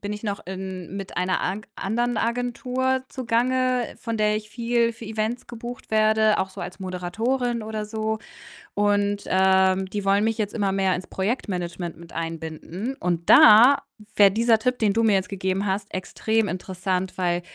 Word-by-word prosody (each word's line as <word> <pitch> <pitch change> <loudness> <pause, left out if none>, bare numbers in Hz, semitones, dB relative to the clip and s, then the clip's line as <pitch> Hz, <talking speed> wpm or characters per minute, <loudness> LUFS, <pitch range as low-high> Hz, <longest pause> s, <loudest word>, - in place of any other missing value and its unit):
bin 205 +1 -4
ich 210 - -7
noch 205 -2 -4
in 190 -1 -6
mit 195 -1 -7
einer 180 +1 0
ank 200 +4 -3
anderen 240 +4 -1
Agentur 250 +3 -1
zugange, 255 0 0
von 230 -1 -3
der 210 0 +2
ich 215 0 -6
viel 235 0 0
für 225 0 -11
Events 220 +2 -3
gebucht 240 +1 -8
werde, 215 0 +3
auch 190 0 -1
so - - -9
als 175 +2 -7
Moderatorin 225 +7 -2
oder 215 0 -4
so, 220 0 -2 0.6
und, 205 0 +1
ähm, 190 0 +3
die 200 +1 -4
wollen 200 +1 +3
mich 225 0 0
jetzt 210 -2 -2
immer 200 -3 0
mehr 190 -1 +1
ins 185 - -7
Projektmanagement 180 -5 -3
mit 170 0 -14
einbinden, 165 +8 -5
und 170 -1 -2
da 235 +6 +8 0.4
wär 200 -1 +8
dieser 225 +3 +3
Tipp, 250 +2 0
den 215 -3 +3
du 230 +2 +1
mir 220 -2 +4
jetzt 190 -1 0
gegeben 190 0 -2
hast, 200 +1 -2
extrem 220 +3 -1
interessant, 185 +1 -3
weil 175 -1 0
210 Hz, 170 wpm, -24 LUFS, 190-230 Hz, 0.6 s, da